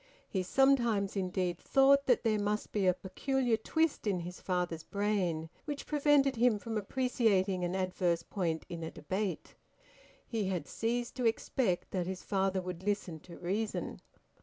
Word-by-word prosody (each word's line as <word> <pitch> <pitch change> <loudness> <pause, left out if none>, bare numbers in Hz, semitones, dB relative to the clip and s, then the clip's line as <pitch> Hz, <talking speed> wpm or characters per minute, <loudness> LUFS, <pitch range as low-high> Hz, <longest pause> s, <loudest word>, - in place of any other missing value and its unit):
He 190 - -1
sometimes 235 -2 +3
indeed 180 -2 -1
thought 275 0 +4
that 245 - +4
there 215 -2 +2
must 210 +1 -1
be 200 -3 +1
a 180 - +5
peculiar 245 +6 0
twist 320 +4 0
in 185 -4 +1
his 180 +1 -7
father's 180 -3 -1
brain 190 -5 -1 0.2
which 290 -2 -4
prevented 285 -3 +3
him 235 -2 +4
from 225 +2 -5
appreciating 210 -5 +1
an 175 +1 -1
adverse 180 -2 0
point 165 -5 -2
in 170 -1 -6
a 160 - -4
debate; 185 +3 -3 0.7
he 225 -4 -2
had 180 -5 -2
ceased 235 +1 -2
to 250 - -1
expect 225 -3 0
that 180 -2 -1
his 190 0 -5
father 190 -1 0
would 180 -1 -5
listen 195 -5 -2
to 170 +2 -12
reason. 205 +5 -3
200 Hz, 160 wpm, -32 LUFS, 180-235 Hz, 0.7 s, a